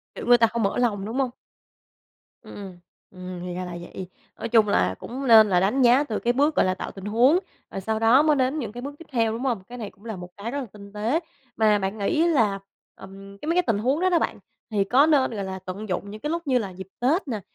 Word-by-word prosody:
Kiểu, - - -6
người 245 0 +6
ta 230 -1 +4
không 230 0 -2
mở 200 - 0
lòng, 210 -5 0
đúng 225 +4 -4
hông? 265 -2 +1 1.1
Ừm, - - -12
ừm, 200 -2 -8 0.4
ừm, 185 -1 -8
thì 180 - -5
ra 180 +1 -4
là 180 - -7
vậy. 180 +1 -8 0.3
Nói - - -4
chung 225 -2 +4
là 95 - +1
cũng 265 +3 -6
nên 220 -3 +8
là 180 -2 +3
đánh 210 +9 +1
giá 250 +3 +5
từ 220 -8 -3
cái 240 - +1
bước, 290 +4 +2
gọi - - +3
là, 185 - +1
tạo - - -6
tình 195 -1 -10
huống, 245 - +4 0.3
rồi 195 - -5
sau 220 +3 -2
đó 230 +6 +5
mới 305 -1 +3
đến 265 +3 0
những 230 -7 -4
cái 240 +2 -8
bước 285 +2 -7
tiếp 330 - -11
theo, 230 -3 +1
đúng 225 +2 -4
hông? 235 -8 -1
Cái 245 - -8
này 215 -4 -6
cũng 200 - -22
là 220 -2 -5
một 180 -1 -9
cái 215 +4 -5
rất 285 - -2
là 270 - -4
tinh 200 -1 -13
tế. 220 +9 0 0.4
Mà 215 -2 +3
bạn 195 +2 -3
nghĩ 310 +11 +1
là, 225 -12 +2 0.4
ừm, 195 +1 -12
cái 295 - -9
mấy 335 - +1
cái 360 - +3
tình 225 -3 +2
huống 260 +7 +1
đó 370 +1 +2
đó 345 -2 +3
bạn, - - -2 0.3
thì 205 -2 +2
có 255 +8 +4
nên, 290 -4 +3
gọi 205 -3 -4
là, 190 0 -5
tận 195 +3 -6
dụng 195 +2 -3
những 215 +1 -9
cái 300 - -3
lúc 335 0 -3
như 260 -2 +3
là 215 -5 -2
dịp 185 0 -10
Tết 295 +9 +1
nè, 225 -5 -3
225 Hz, 275 wpm, -24 LUFS, 200-265 Hz, 1.1 s, nên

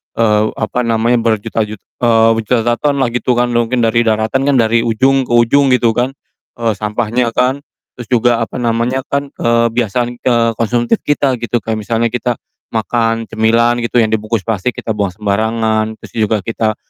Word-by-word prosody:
eee, 105 -2 +2
apa 115 +2 -2
namanya 115 +1 +2
berjuta-jut 110 -1 -1 0.2
eee, 115 -2 +4
berjuta-juta 115 +1 0
ton 145 -1 +1
lah 120 - -1
gitu 125 +1 0
kan 120 0 +1
mungkin 120 +1 +1
dari 115 +1 +2
daratan 110 +5 0
kan 140 - +3
dari 115 -1 +3
ujung 130 +3 +2
ke - - -7
ujung 130 +4 +4
gitu 115 -2 +2
kan, 125 +2 0 0.5
eee, 115 -2 +1
sampahnya 115 +3 -1
kan. 130 +2 +1 0.4
Terus 120 -2 -9
juga 120 -1 +2
apa 115 - -6
namanya 120 +2 0
kan, 140 0 -2
kebiasaan, 115 +1 0
eee, 115 -2 +2
konsumtif 120 - +1
kita 140 -3 +1
gitu 120 0 -1
kayak 110 -1 -2
misalnya 115 +2 0
kita 120 0 -1 0.4
makan 115 +1 0
cemilan 115 +2 +2
gitu 120 0 +1
yang 110 - -1
dibungkus 110 -1 -1
plastik 115 +2 -2
kita 110 - -4
buang 105 -2 0
sembarangan, 110 +2 -1
terus - - -12
juga 110 -2 0
kita 110 -1 -1
115 Hz, 170 wpm, -15 LUFS, 110-120 Hz, 0.5 s, eee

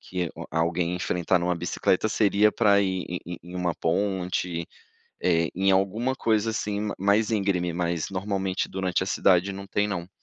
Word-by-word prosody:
que 90 -3 -3
o - - -7
a 80 - -1
alguém 85 +1 0
enfrentar 90 0 +1
numa 90 +1 0
bicicleta 90 +4 0
seria 105 0 +3
pra 100 -3 +4
ir 95 -2 -1
em 90 - -4
em 85 0 -6
em 90 +2 -11
uma 90 -2 -1
ponte, 90 -1 -1 0.5
eh, 85 -2 +2
em 95 +2 +2
alguma 105 +7 +1
coisa 110 -3 +1
assim 105 -2 -2
ma 105 -1 -2
mais 100 +3 +2
íngreme, 95 -5 0
mas 85 0 -2
normalmente 95 -1 -2
durante 95 -1 -1
a - - -3
cidade 95 0 +3
não 100 0 -8
tem 105 +1 0
não. 90 -3 -4
95 Hz, 180 wpm, -26 LUFS, 90-100 Hz, 0.5 s, pra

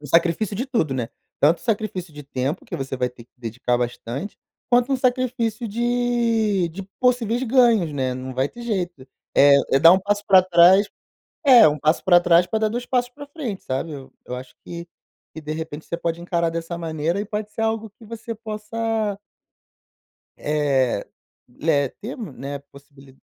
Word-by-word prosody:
um 150 - -9
sacrifício 170 +7 +2
de 250 +7 -3
tudo, 230 - 0
né. 125 -3 -2 0.3
Tanto 155 +4 +4
um - - -16
sacrifício 200 -7 -2
de 145 - -9
tempo, 135 +1 -3
que - - -6
você 135 -1 -4
vai 125 0 0
ter 125 -1 -15
que - - -42
dedicar 120 +1 -2
bastante, 120 - -4 0.3
quanto 245 +2 +3
um 270 - +3
sacrifício 245 -3 0
de 230 -4 +1
de 175 +4 -7 0.2
possíveis 245 -1 +2
ganhos, 235 - +3
né. 130 -3 -1
Não 130 0 -6
vai 130 +2 0
ter 240 - -11
jeito. 180 - -3 0.3
Eh, 140 0 +7 0.2
é 135 - +6
dar 165 +4 +8
um 190 - +3
passo 205 +2 -1
pra 190 -2 +7
trás 185 +2 +6 0.6
é, 255 -3 +9
é 155 - +8
1 150 0 -2
passo 155 +3 +1
pra 175 -2 +6
trás 175 0 +4
pra 220 - -1
dar 220 - +1
2 240 +3 -4
passos 245 -1 0
pra 285 +3 -11
frente, 280 - -6
sabe. 135 +5 -3
Eu 135 -2 -10
eu 125 - -5
acho 125 0 -9
que 170 0 -7 0.5
que, 160 - -8
de 150 0 -4
repente, 160 -1 -6
você - - -6
pode 170 0 -3
encarar 170 -1 0
dessa 165 +1 -4
maneira 165 +2 -2
e - - -3
pode 210 0 -5
ser - - -6
algo 220 0 -1
que 220 +3 -18
você 230 +1 -6
possa 220 -1 -3 1.2
eh 140 -7 +1 0.6
eh, 145 -3 +2
ter 230 +6 -6
um 215 - -6
né, 140 +2 -6
possibili 140 -1 -17
175 Hz, 190 wpm, -22 LUFS, 145-225 Hz, 1.2 s, é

